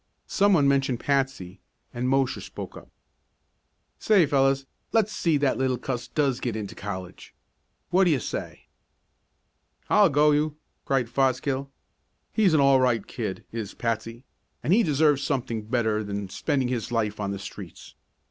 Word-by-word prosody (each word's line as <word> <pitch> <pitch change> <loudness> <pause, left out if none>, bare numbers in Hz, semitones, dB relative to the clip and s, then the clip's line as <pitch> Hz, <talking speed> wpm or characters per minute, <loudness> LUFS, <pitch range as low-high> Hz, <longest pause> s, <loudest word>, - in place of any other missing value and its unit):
Some, 200 0 +3
one 145 -6 +4
mentioned 135 -3 +1
Patsy, 135 -10 -1 0.3
and 125 +1 -1
Mosher 135 -1 +1
spoke - - -8
up: - - -12 1.1
"Say, 200 -6 +4
fellows, 135 -1 +2 0.3
let's 215 -2 +2
see 165 -3 +2
that 140 0 +2
that - - -7
little 130 -1 +1
cuss 125 0 -4
does 140 -4 0
get 120 -3 -3
into 105 -3 -5
college. 95 -3 -8 0.6
What 185 +2 +4
do - - +4
you 145 -5 +2
say?" - - -6 1.3
"I'll 205 -3 +6
go 150 +1 +4
you!" 150 +1 0 0.3
cried 135 -3 +1
Fosgill. 135 +2 0 0.6
"He's 195 -7 +3
an - - +4
all 135 -1 +5
right 120 -5 +1
kid, - - -5
is 110 -3 -5
Patsy, 115 +1 -3 0.4
and 170 - +2
he 225 - +5
deserves 150 -5 +3
something 125 -6 -2
better 110 -3 0
than 100 -1 -4
spending 135 - -1
his 120 -2 -3
life 110 -3 -1
on 100 -1 -2
the 100 - -3
streets. 95 - -10
135 Hz, 155 wpm, -26 LUFS, 115-145 Hz, 1.3 s, I'll